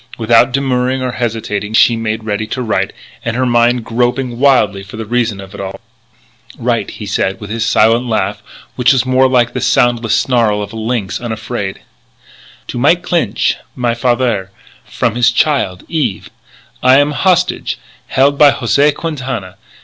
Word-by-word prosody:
Without 120 Hz, +2 st, +4 dB
demurring 130 Hz, -1 st, 0 dB
or 130 Hz, -, -1 dB
hesitation 110 Hz, -3 st, -3 dB
she 115 Hz, -, +5 dB
made 110 Hz, -1 st, -3 dB
ready 110 Hz, 0 st, -2 dB
to 125 Hz, +3 st, -3 dB
write, 110 Hz, -, -1 dB, 0.3 s
her 120 Hz, +2 st, -1 dB
mind 120 Hz, 0 st, +2 dB
groping 120 Hz, +1 st, -1 dB
wildly 125 Hz, -8 st, +3 dB
for 100 Hz, +3 st, -10 dB
the 110 Hz, -, -5 dB
reason 115 Hz, -2 st, -1 dB
of 95 Hz, 0 st, -10 dB
it 100 Hz, -, -7 dB
all. 95 Hz, 0 st, -6 dB, 0.8 s
"Write," -, -, -1 dB
he -, -, -7 dB
said, 95 Hz, +2 st, -1 dB
with 105 Hz, -2 st, -8 dB
his 115 Hz, 0 st, -1 dB
silent 115 Hz, +1 st, +3 dB
laugh 110 Hz, -, -1 dB, 0.3 s
which 125 Hz, +1 st, +4 dB
was 130 Hz, -1 st, +1 dB
more 130 Hz, +1 st, +3 dB
like 120 Hz, -2 st, +2 dB
the 130 Hz, -, -3 dB
soundless 120 Hz, -2 st, +2 dB
snarl 115 Hz, -5 st, +1 dB
of 100 Hz, -, -9 dB
a -, -, -8 dB
lynx 110 Hz, -3 st, -3 dB
unafraid: 110 Hz, -3 st, -4 dB, 0.9 s
"To 120 Hz, -, -4 dB
Mike 165 Hz, +7 st, +3 dB
Clinch, 165 Hz, -, 0 dB, 0.2 s
my 120 Hz, -2 st, 0 dB
fathaire, 120 Hz, -5 st, 0 dB, 0.4 s
from -, -, -1 dB
his 120 Hz, 0 st, +3 dB
child, 120 Hz, -8 st, 0 dB
Eve.... 140 Hz, -, -2 dB, 0.5 s
I 130 Hz, +1 st, +6 dB
am 145 Hz, +1 st, +3 dB
hostage, 180 Hz, +3 st, 0 dB, 0.3 s
held 140 Hz, +2 st, +2 dB
by 145 Hz, -2 st, +7 dB
José 140 Hz, +4 st, +2 dB
Quintana. 130 Hz, -, -5 dB
120 Hz, 160 wpm, -15 LUFS, 110-130 Hz, 0.9 s, by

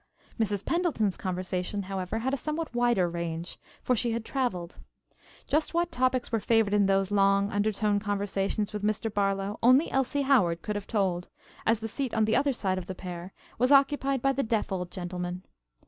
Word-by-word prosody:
Mrs. 205 Hz, -3 st, -1 dB
Pendleton's 320 Hz, -, +1 dB
conversation, 185 Hz, +1 st, -3 dB
however, 190 Hz, +2 st, -3 dB
had 260 Hz, +4 st, -1 dB
a -, -, +4 dB
somewhat 305 Hz, +3 st, -4 dB
wider 240 Hz, -6 st, +2 dB
range, 170 Hz, 0 st, -5 dB, 0.2 s
for 250 Hz, -, +2 dB
she 235 Hz, 0 st, 0 dB
had 230 Hz, -1 st, -3 dB
traveled. 185 Hz, -11 st, -2 dB, 0.7 s
Just 310 Hz, +3 st, 0 dB
what 345 Hz, 0 st, +1 dB
topics 255 Hz, -3 st, 0 dB
were 225 Hz, -, +1 dB
favored 220 Hz, -1 st, +2 dB
in 205 Hz, -1 st, +4 dB
those 195 Hz, 0 st, +2 dB
long 200 Hz, 0 st, +3 dB
undertone 205 Hz, 0 st, +1 dB
conversations 205 Hz, 0 st, -1 dB
with 210 Hz, -, -3 dB
Mr. 215 Hz, +1 st, -1 dB
Barlow 195 Hz, 0 st, 0 dB
only 255 Hz, +6 st, +5 dB
Elsie 270 Hz, +2 st, +1 dB
Howard 190 Hz, -12 st, +3 dB
could 210 Hz, -, -3 dB
have 205 Hz, -1 st, -4 dB
told, 185 Hz, -5 st, 0 dB, 0.4 s
as 225 Hz, 0 st, +3 dB
the 225 Hz, -, -3 dB
seat 255 Hz, +2 st, -3 dB
on 220 Hz, -1 st, +3 dB
the 220 Hz, -, +2 dB
other 280 Hz, 0 st, +3 dB
side 190 Hz, -7 st, -1 dB
of 180 Hz, -, -9 dB
the 185 Hz, -, -5 dB
pair 180 Hz, 0 st, -7 dB, 0.3 s
was 250 Hz, +3 st, +3 dB
occupied 275 Hz, -2 st, +3 dB
by 275 Hz, -, +4 dB
the 270 Hz, -, 0 dB
deaf 225 Hz, -4 st, -1 dB
old 180 Hz, -2 st, -2 dB
gentleman. 180 Hz, 0 st, -5 dB
210 Hz, 185 wpm, -28 LUFS, 190-250 Hz, 0.7 s, only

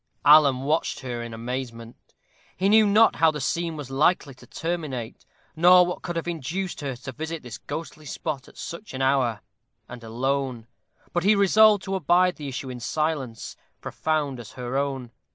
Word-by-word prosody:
Alan 145 Hz, -3 st, +7 dB
watched 150 Hz, +3 st, -1 dB
her 120 Hz, -3 st, -4 dB
in 120 Hz, 0 st, -6 dB
amazement. 115 Hz, 0 st, -7 dB, 0.4 s
He 190 Hz, +2 st, +2 dB
knew 215 Hz, 0 st, +6 dB
not 215 Hz, +3 st, +5 dB
how 165 Hz, -, +5 dB
the 150 Hz, -1 st, -3 dB
scene 165 Hz, +3 st, -2 dB
was 140 Hz, -3 st, -7 dB
likely 145 Hz, +1 st, +2 dB
to 130 Hz, -, -17 dB
terminate, 150 Hz, -9 st, -5 dB, 0.3 s
nor 180 Hz, +2 st, +7 dB
what 180 Hz, -, -4 dB
could 175 Hz, -, -5 dB
have 165 Hz, 0 st, -3 dB
induced 175 Hz, +3 st, -4 dB
her 135 Hz, -3 st, -3 dB
to 130 Hz, +2 st, -8 dB
visit 160 Hz, +3 st, -6 dB
this 115 Hz, -4 st, -8 dB
ghostly 155 Hz, -1 st, -7 dB
spot 140 Hz, -2 st, -4 dB
at -, -, -18 dB
such 170 Hz, -2 st, -8 dB
an 135 Hz, -, -2 dB
hour, 130 Hz, -5 st, +1 dB, 0.5 s
and 125 Hz, -1 st, -10 dB
alone; 125 Hz, +1 st, -2 dB, 0.5 s
but 175 Hz, -, 0 dB
he 210 Hz, +3 st, +5 dB
resolved 205 Hz, 0 st, +5 dB
to 195 Hz, -, -4 dB
abide 180 Hz, 0 st, +2 dB
the 150 Hz, -3 st, -6 dB
issue 130 Hz, 0 st, -5 dB
in 125 Hz, -, -7 dB
silence 135 Hz, -4 st, -3 dB, 0.2 s
profound 150 Hz, -5 st, -2 dB
as 115 Hz, -, -10 dB
her 125 Hz, 0 st, -5 dB
own. 135 Hz, -3 st, -2 dB
145 Hz, 175 wpm, -25 LUFS, 125-170 Hz, 0.5 s, Alan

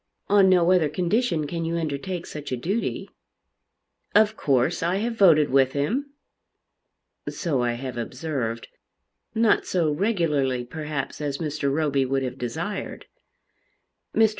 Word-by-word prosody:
On 200 Hz, -1 st, +6 dB
no 180 Hz, -1 st, +4 dB
other 175 Hz, -5 st, +3 dB
condition 175 Hz, -, 0 dB
can 165 Hz, +3 st, -3 dB
you 165 Hz, +1 st, -1 dB
undertake 165 Hz, +3 st, -3 dB
such 150 Hz, -2 st, -7 dB
a 130 Hz, -, -1 dB
duty." 195 Hz, -, -2 dB, 1.1 s
"Of 215 Hz, 0 st, +5 dB
course 140 Hz, -, +1 dB
I 170 Hz, +2 st, +1 dB
have 230 Hz, +4 st, -1 dB
voted 160 Hz, -, +5 dB
with 130 Hz, -1 st, +4 dB
him." 250 Hz, -, -1 dB, 1.2 s
"So 150 Hz, -8 st, -1 dB
I 120 Hz, -1 st, +1 dB
have 125 Hz, 0 st, -6 dB
observed, 125 Hz, -2 st, -3 dB, 0.7 s
not 225 Hz, -1 st, +3 dB
so 165 Hz, -4 st, +1 dB
regularly 150 Hz, -, 0 dB
perhaps 150 Hz, +2 st, -5 dB
as 145 Hz, -2 st, -2 dB
Mr. 150 Hz, -3 st, -2 dB
Roby 140 Hz, -2 st, +1 dB
would 135 Hz, +1 st, 0 dB
have 125 Hz, -, -5 dB
desired." 160 Hz, -, -4 dB, 1.1 s
Mr. 220 Hz, -1 st, +5 dB
155 Hz, 135 wpm, -25 LUFS, 135-185 Hz, 1.2 s, On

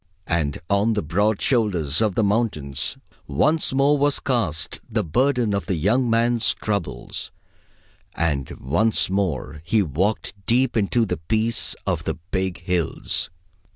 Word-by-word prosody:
And 80 Hz, -4 st, 0 dB
on 100 Hz, +4 st, +2 dB
the 105 Hz, -, -1 dB
broad 100 Hz, +7 st, +1 dB
shoulders 90 Hz, -, +2 dB
of 105 Hz, -4 st, +1 dB
the 110 Hz, -, +2 dB
mountains 100 Hz, -, -1 dB, 0.3 s
once 150 Hz, -, +2 dB
more 140 Hz, +2 st, +3 dB
was 145 Hz, 0 st, +2 dB
cast 110 Hz, -, -1 dB
the 110 Hz, -2 st, 0 dB
burden 125 Hz, -, +1 dB
of 100 Hz, -, -2 dB
the 95 Hz, -, 0 dB
young 115 Hz, +10 st, +2 dB
man's 115 Hz, 0 st, +2 dB
troubles, 100 Hz, -4 st, -4 dB, 0.9 s
and 75 Hz, -5 st, -1 dB
once 95 Hz, +9 st, +2 dB
more 95 Hz, -6 st, -2 dB
he 105 Hz, +5 st, +2 dB
walked 95 Hz, +7 st, -1 dB
deep 125 Hz, +1 st, +2 dB
into 115 Hz, +2 st, +2 dB
the -, -, -2 dB
peace 110 Hz, +7 st, 0 dB
of -, -, -1 dB
the -, -, -1 dB
big 95 Hz, +2 st, -3 dB
hills. 90 Hz, -2 st, -1 dB
105 Hz, 140 wpm, -23 LUFS, 85-115 Hz, 0.9 s, more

